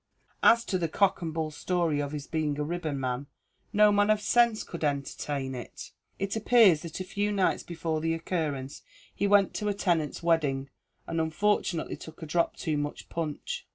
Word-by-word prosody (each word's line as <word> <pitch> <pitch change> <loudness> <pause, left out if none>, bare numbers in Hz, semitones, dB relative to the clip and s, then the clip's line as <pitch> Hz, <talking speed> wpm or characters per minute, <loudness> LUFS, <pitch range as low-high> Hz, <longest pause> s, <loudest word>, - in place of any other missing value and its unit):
As 230 0 +5
to 185 - -1
the 170 - 0
cock 195 +4 +2
and 165 -2 -3
bull 160 -1 -2
story 165 -1 0
of 145 -1 -2
his 145 -2 -5
being 155 -3 -1
a 150 - -1
ribbonman, 140 -5 -3 0.4
no 210 -1 +5
man 205 0 +3
of 215 0 +4
sense 235 0 +3
could 170 - -7
entertain 140 -1 -2
it. 125 -2 -8 0.3
It 200 +2 -2
appears 220 -7 +5
that 170 0 -7
a - - -2
few 205 +3 -1
nights 195 -2 +1
before 165 -2 -3
the 165 +1 0
occurrence 155 -5 -3 0.3
he 200 - 0
went 200 -1 +4
to 210 -1 -2
a 205 - -1
tenant's 170 -6 0
wedding, 140 -5 +1 0.3
and 165 0 -1
unfortunately 170 +1 0
took 160 +1 -11
a - - -4
drop 170 +2 0
too 155 -2 -1
much 145 0 -4
punch. 170 - -4
165 Hz, 185 wpm, -28 LUFS, 150-200 Hz, 0.4 s, As